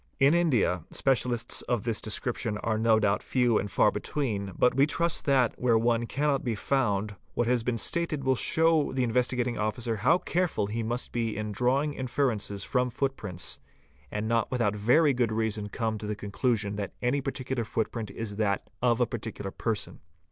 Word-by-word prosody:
In 140 +2 +5
India, 125 - +2
specialists 120 -3 0
of 120 -5 -1
this 115 -2 -1
description 110 0 -2
| - - -25
are 110 -1 0
no 110 -1 +4
doubt 100 -1 +1
few 125 -4 +2
and 100 - -3
far - - +3
between, 105 -9 -2
but 125 - +4
we 135 +3 +4
trust 170 +1 0
that, 130 -4 +3
where 120 -2 +3
one 115 0 +1
cannot 145 +1 0
_ - - -15
be 120 -3 -1
found, 105 -4 0 0.2
what 120 - +1
has 120 0 +2
been 115 +1 -1
stated 155 +4 0
will 130 0 +3
show 160 +3 +2
the 130 -1 +1
Investigating 125 0 0
Officer 110 +2 -1
how 135 - +4
careful 180 - 0
he 110 +3 -3
must 120 +3 -3
be 115 -2 -2
in 105 0 -3
drawing 135 +7 +1
inferences 120 -7 -1
from 125 -1 0
footprints, 95 - -3 0.5
and 105 +5 -3
not 115 0 +1
with 125 - -2
out 105 -3 +1
very 130 +8 +4
good 120 -3 +1
reason 110 -1 -1
come 110 -1 -2
to 105 - -6
the 105 - -2
conclusion 105 0 -1
that 100 -2 -4
any 130 +3 +1
particular 130 -2 -3
footprint 110 0 -3
is 105 -3 -5
that 100 -3 -1
of 120 -1 +3
a - - +5
particular 110 -4 -5
person. 110 -1 -3
115 Hz, 190 wpm, -28 LUFS, 105-130 Hz, 0.5 s, In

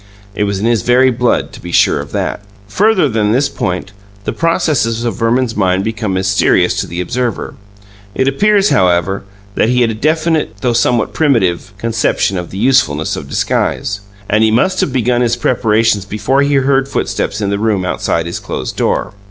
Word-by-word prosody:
It 105 - -1
was 100 -1 -2
in 105 - -2
his 115 -3 +2
very 125 +4 +4
blood 125 0 0
to - - -11
be 85 - -7
sure - - +3
of - - -7
that. - - -2 0.3
Further 190 - +2
than 110 -4 0
this 135 +4 +2
point, 90 +2 -3 0.3
the - - -3
processes 140 -9 0
of 115 - -1
Verman's 115 +1 0
mind 95 -2 +1
become 110 -3 -2
mysterious 95 +1 +2
to - - -5
the 85 - -6
observer. 120 +6 -2 0.6
It 130 - +1
appears, 205 +8 +3
however, 90 +2 +1 0.3
that 110 - +1
he 125 0 +2
had 115 -2 +2
a - - -3
definite 155 +6 0
(though 125 -2 +1
somewhat 120 0 +1
primitive) 105 - +1
conception 110 -3 0
of 90 - -7
the 95 - -8
usefulness 100 - +1
of - - -8
disguise; 105 0 -1 0.3
and 110 +1 +2
he 110 - +4
must 185 +12 +1
have - - 0
begun 125 -1 +1
his 120 -1 +1
preparations 110 -4 +1
before 110 +7 0
he 140 0 +1
heard 135 0 +2
footsteps 105 -5 -2
in 100 -2 -1
the 100 - -1
room 105 -4 0
outside 85 0 -1
his 85 - -4
closed - - -5
door. - - -1
115 Hz, 185 wpm, -14 LUFS, 100-130 Hz, 0.6 s, very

